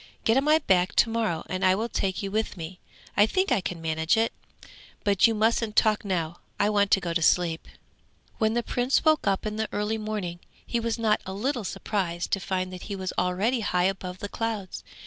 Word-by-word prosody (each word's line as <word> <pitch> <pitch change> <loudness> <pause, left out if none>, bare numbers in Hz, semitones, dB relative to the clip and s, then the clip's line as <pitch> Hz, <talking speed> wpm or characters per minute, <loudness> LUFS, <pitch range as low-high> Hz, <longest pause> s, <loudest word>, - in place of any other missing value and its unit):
Get 225 - +3
on 270 +2 +2
my 305 +1 +6
back 185 - +2
to 230 - +4
morrow 220 -8 -1
and 185 +1 -3
I 185 0 +5
will 220 +4 -1
take 195 -4 -2
you 195 - -3
with 215 -1 -1
me; 170 +2 -7 0.4
I 205 +1 +5
think 375 - 0
I 235 -6 +3
can 180 -1 -4
manage 160 +3 +1
it! 225 +1 +1 0.7
But 200 +1 +4
you 225 - 0
mustn't 220 0 +1
talk 215 -2 +3
now, 175 -4 -2 0.2
I 205 +1 +3
want 205 -1 +3
to 195 - +5
go 170 -2 -3
to 165 - 0
sleep.' 165 0 +2 0.7
When 220 0 +2
the 240 - +1
Prince 245 +6 +1
woke 310 -7 +3
up 195 +1 +1
in 215 0 -3
the 220 0 -1
early 210 +2 -1
morning, 210 -5 -4 0.3
he 235 - -1
was 230 0 -1
not 220 -2 +2
a 190 - -4
little 240 +4 -1
surprised 180 -4 -3
to 195 - +2
find 185 -1 -2
that 180 - -8
he 200 - -2
was 190 -1 -4
already 200 +8 +1
high 180 -4 +1
above 185 -1 -2
the 205 - -5
clouds. 215 -3 -4
205 Hz, 220 wpm, -26 LUFS, 185-225 Hz, 0.7 s, my